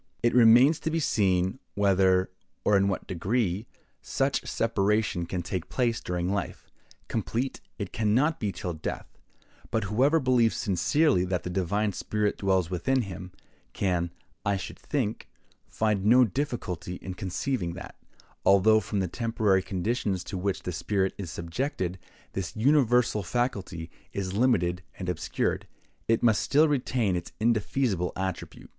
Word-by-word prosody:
It 120 - +3
remains 125 +6 +6
to - - -2
be 165 +1 0
seen 95 - +1 0.2
whether, 95 -2 +3 0.3
or 105 - +4
in 100 0 +4
what 95 - -2
degree, 100 +2 -1 0.3
such - - -1
separation 105 -5 0
can 90 0 -3
take 90 0 -4
place 120 -3 0
during 90 0 -2
life; 100 -1 -3 0.4
complete 130 +4 -2 0.2
it 100 -4 -5
can 110 -2 +1
not 150 +5 +2
be 105 -3 -1
till 90 -2 -4
death; 80 - -5 0.6
but 110 - 0
whoever 130 +11 +3
believes 125 -4 +3
sincerely 100 - +2
that 90 -1 -2
the 90 - -4
divine 100 +3 0
spirit 105 +1 -1
dwells 95 -3 +2
within 125 +9 +1
him, 90 -2 -8 0.4
can, 90 -3 0 0.3
I 100 -2 +1
should 95 - -7
think, 120 -7 -2 0.4
find 105 -3 0
no 125 +4 +6
difficulty 90 - -3
in 95 0 -7
conceiving 95 0 -2
that, 90 - -9 0.5
although 100 +3 +5
from 100 -1 -2
the 95 - 0
temporary 110 -2 +1
conditions 95 0 -2
to - - -7
which 100 +1 -2
that 90 - -3
spirit 95 +2 0
is 95 -4 -5
subjected, 90 - -3 0.3
this 95 -3 -4
universal 125 -3 +3
faculty 95 -6 -2 0.2
is 95 -2 -3
limited 100 -7 +2 0.2
and 90 -2 -4
obscured, 90 - -2 0.4
it 115 0 +2
must 110 -3 +4
still 150 +3 +4
retain 125 -8 0
its 85 -1 -5
indefeasible 110 -4 +1
attribute. 95 -1 -5
100 Hz, 145 wpm, -27 LUFS, 90-120 Hz, 0.6 s, remains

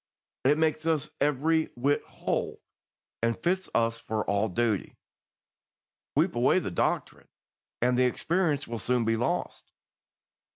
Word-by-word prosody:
It 145 +3 +5
makes 155 0 +1
us 155 -2 0
every 155 +3 +2
whit 140 +4 +1
whole, - - -3 0.6
and 115 0 +1
fits 185 +8 -1
us 115 0 +2
for 110 -1 -3
all 100 +2 +2
duty. 110 0 -1 1.2
Sweep - - +3
away - - +3
the - - -1
doctrine, - - -1 0.6
and 125 0 +3
the 125 +1 +4
experience 155 +2 0
will 115 -1 -4
soon 125 -1 +1
be 115 0 +2
lost. 115 +2 -2
125 Hz, 130 wpm, -28 LUFS, 115-155 Hz, 1.2 s, It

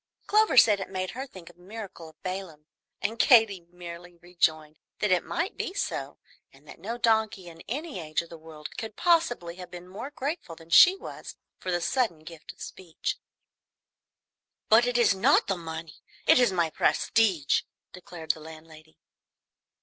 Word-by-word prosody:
Clover 425 -8 +3
said 210 -4 +7
it 195 - -5
made 185 -1 -3
her 265 +3 -6
think 180 -8 -13
of 175 - -31
the - - -22
miracle 190 -4 -9
of 160 - -24
Balaam; 185 -5 -6 0.4
and 225 +2 -2
Katy 205 -8 +5
merrily 175 0 -10
rejoined 160 -3 -1 0.2
that 210 - 0
it 180 - +3
might 355 +6 -3
be 370 - -4
so, - - -3 0.3
and - - -22
that - - -12
no 235 - -5
donkey 220 -5 +1
in 165 -1 -12
any 290 - -4
age 155 0 -2
of 170 - -16
the 165 - -10
world 155 -1 -10
could 220 -2 -6
possibly 320 - +1
have 180 -1 -9
been 175 0 -10
more 205 +9 -7
grateful 285 - -5
than 165 0 -16
was - - -3
she 365 - +8 0.6
for 185 - -6
the 175 - +1
sudden 220 - 0
gift 160 -1 -10
of - - -25
speech. 170 -4 -5 1.5
"But 230 +3 +6
it 245 -1 +1
is 235 -4 +5
not 225 +10 +4
the 195 - -1
money, 160 -2 -8 0.2
it - - +6
is 245 -5 +4
my 170 -3 0
prestige," 190 -9 +2 0.3
declared 175 -3 -4
the 155 - -10
landlady. 155 0 -13
185 Hz, 175 wpm, -27 LUFS, 165-230 Hz, 1.5 s, she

